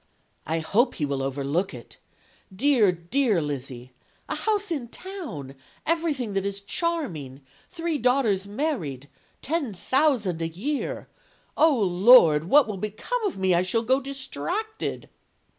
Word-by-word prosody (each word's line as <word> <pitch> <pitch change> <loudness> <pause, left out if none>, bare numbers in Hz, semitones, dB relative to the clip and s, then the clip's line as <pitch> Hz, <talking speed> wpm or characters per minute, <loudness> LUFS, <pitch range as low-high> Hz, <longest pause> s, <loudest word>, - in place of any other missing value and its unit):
I 160 +2 0
hope 235 +10 +2
he 150 - -1
will 140 -1 -2
overlook 140 +6 -1
it. 120 - -12 0.5
Dear, 220 -1 +4
dear 200 +5 +1
Lizzy! 130 -4 -5 0.3
A - - -2
house 420 -3 -1
in 280 -7 -2
town! 295 - -7 0.3
Everything 305 -9 0
that 195 -1 0
is 200 0 -3
charming! 200 - -3 0.3
Three 330 -3 -2
daughters 235 -6 +2
married! 200 - -3 0.3
Ten 285 - -2
thousand 245 - +1
a 165 - 0
year! 280 - -3 0.5
Oh, 310 -4 +4
Lord! 180 -5 +6
what 280 +9 +5
will 210 -3 -4
become 215 - -3
of 375 - -5
me? 190 -1 +2
I 170 - +4
shall 205 +5 0
go 260 +4 +2
distracted.' 340 +11 -4
215 Hz, 135 wpm, -25 LUFS, -, 0.5 s, Lord